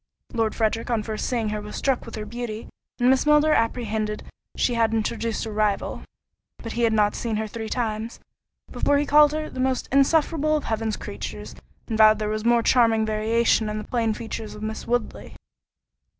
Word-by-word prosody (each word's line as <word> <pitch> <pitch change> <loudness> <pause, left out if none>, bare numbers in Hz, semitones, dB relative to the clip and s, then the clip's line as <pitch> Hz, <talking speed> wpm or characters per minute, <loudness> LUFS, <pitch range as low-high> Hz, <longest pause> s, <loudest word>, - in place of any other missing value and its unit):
Lord 225 -2 0
Frederick 225 +1 0
on 230 -3 0
first 215 0 -3
seeing 230 -4 -1
her 210 0 -3
was 210 0 -8
struck 270 -3 -1
with - - -7
her 215 -1 -5
beauty, 230 0 -6 0.3
and 245 - +3
Miss 265 +2 +2
Milner 300 +1 +5
apprehended 220 -3 -1 0.3
she 245 - +1
had 225 -1 +2
introduced 225 +1 -2
a 220 - -5
rival; 210 -1 -1 0.6
but 230 - -7
he 235 - -3
had 230 -1 +3
not 210 -1 +3
seen 230 -2 -3
her 220 +1 -1
three 220 +1 -6
times, 225 -1 -3 0.5
before 285 - +2
he 290 - +1
called 295 0 +6
her 310 0 -3
"The 255 - -9
most 260 0 0
insufferable 305 +2 +3
of 300 - -5
Heaven's 220 -1 -2
creatures," - - -7 0.3
and 225 -2 -3
vowed 215 0 +7
there 210 0 -2
was 215 0 -2
more 235 0 +3
charming 225 -3 +4
variation 220 +1 +1
in 210 - -3
the 215 - -4
plain 225 -1 -1
features 220 -1 -6
of 210 - -9
Miss 220 0 -5
Woodley. 240 -2 -3
225 Hz, 195 wpm, -24 LUFS, 215-245 Hz, 0.6 s, vowed